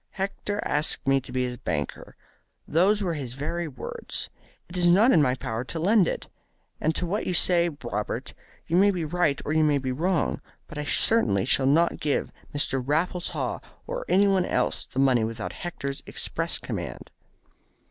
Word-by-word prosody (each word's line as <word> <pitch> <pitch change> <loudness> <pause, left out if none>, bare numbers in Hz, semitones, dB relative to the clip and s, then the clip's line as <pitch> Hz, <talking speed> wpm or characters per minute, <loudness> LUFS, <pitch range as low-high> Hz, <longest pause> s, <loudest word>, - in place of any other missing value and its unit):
Hector 200 +1 -3
asked 150 +1 +1
me 135 0 +4
to 125 - -11
be 130 0 0
his 125 -1 -3
banker. 75 - -4 0.5
Those 200 +6 +3
were 175 -3 0
his 130 -6 -5
very 165 +5 -3
words. 140 - -5 0.4
It 175 - -11
is 175 -1 +2
not 205 +9 +6
in 160 - +6
my 130 -3 +2
power 125 -3 -3
to 165 - -4
lend 195 +2 +4
it. - - -3 0.5
As 155 - +2
to 180 - -1
what 195 +5 -2
you 180 - 0
say, 175 0 +4
Robert, 105 -3 -3 0.3
you 170 - +1
may 200 +2 +6
be 180 -5 -1
right 155 -3 +1
or 150 - -1
you 155 0 +4
may 150 -2 +3
be 130 -1 -2
wrong, 165 +5 0 0.2
but 150 - -8
I 150 - -3
certainly 110 - +3
shall 130 - +3
not 165 +5 +3
give 150 -2 0 0.2
Mr. 135 -2 0
Raffles 165 +6 0
Haw - - -2 0.3
or - - -4
anyone 195 -1 +4
else 125 - 0
the - - -12
money 130 -4 +4
without 110 -1 -4
Hector's 140 -6 -5
express - - -2
command." - - -6
155 Hz, 180 wpm, -26 LUFS, 130-180 Hz, 0.5 s, not